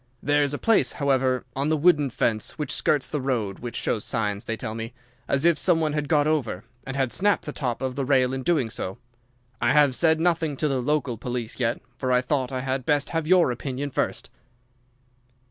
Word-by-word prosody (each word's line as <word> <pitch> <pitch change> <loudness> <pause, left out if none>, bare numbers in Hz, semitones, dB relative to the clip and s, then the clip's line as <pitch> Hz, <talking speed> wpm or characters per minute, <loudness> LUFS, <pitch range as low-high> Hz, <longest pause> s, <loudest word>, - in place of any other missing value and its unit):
There's 145 -1 +2
a 145 - -2
place, 225 +5 +2
however, 130 -3 +1
on 140 +3 0
the 155 - +2
wooden 150 -3 +4
fence 110 -2 -1
which 150 -3 -3
skirts 145 -3 +1
the 150 - -3
road 115 -7 -2
which 120 -1 -6
shows 110 - -1
signs, 105 -2 -2
they 115 - -3
tell 110 -2 -5
me, 115 0 -6 0.3
as 140 +3 +1
if 170 -4 +4
some 165 +4 +3
one 155 -2 0
had 150 -1 -2
got 150 -2 +3
over, 140 -11 -1 0.2
and 135 - -4
had 135 -3 0
snapped 205 +1 +2
the 150 - -4
top 125 -2 -3
of 130 -1 -1
the 140 - -2
rail 130 -1 +2
in 135 - -3
doing 135 -7 +1
so. 95 +1 -5 0.6
I 120 - +3
have 145 -3 +4
said 160 +1 +3
nothing 165 -4 +1
to 150 - 0
the 135 -3 0
local 140 -3 0
police 120 -1 -4
yet, 120 -1 0 0.2
for 130 -1 -1
I 125 0 +4
thought 130 -1 -1
I 130 -1 -2
had 130 0 -2
best 145 +1 +1
have 165 -2 -1
your 180 -6 +5
opinion 135 +3 -4
first." - - -2
135 Hz, 215 wpm, -25 LUFS, 125-150 Hz, 0.6 s, your